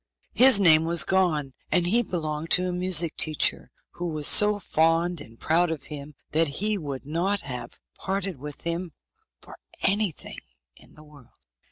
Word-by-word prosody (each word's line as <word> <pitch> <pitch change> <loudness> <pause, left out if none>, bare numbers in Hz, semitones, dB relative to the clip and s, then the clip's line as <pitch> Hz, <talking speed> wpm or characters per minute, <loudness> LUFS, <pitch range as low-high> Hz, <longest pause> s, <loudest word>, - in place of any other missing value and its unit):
His 255 -4 +7
name 160 -4 +5
was 170 0 +4
Gon, 160 -8 0 0.2
and 180 -2 +2
he 225 +7 +3
belonged 160 -6 -4
to 180 0 +2
a 180 - -3
music 180 -2 0
teacher, 155 -2 +1 0.2
who 175 - -6
was 155 -3 -2
so 210 0 +4
fond 165 -2 0
and 115 -5 -12
proud 170 +2 +1
of 160 -3 -5
him 145 0 -8 0.2
that 160 +1 +2
he 210 +10 0
would 140 -8 -6
not 180 +7 -1
have 125 -3 -8 0.2
parted 190 -5 -4
with 145 +1 -9
him 170 0 -4 0.5
for - - -13 0.3
anything 200 -4 -1 0.4
in - - -16
the 150 - -16
world. 145 -5 -19
165 Hz, 165 wpm, -25 LUFS, 150-185 Hz, 0.5 s, His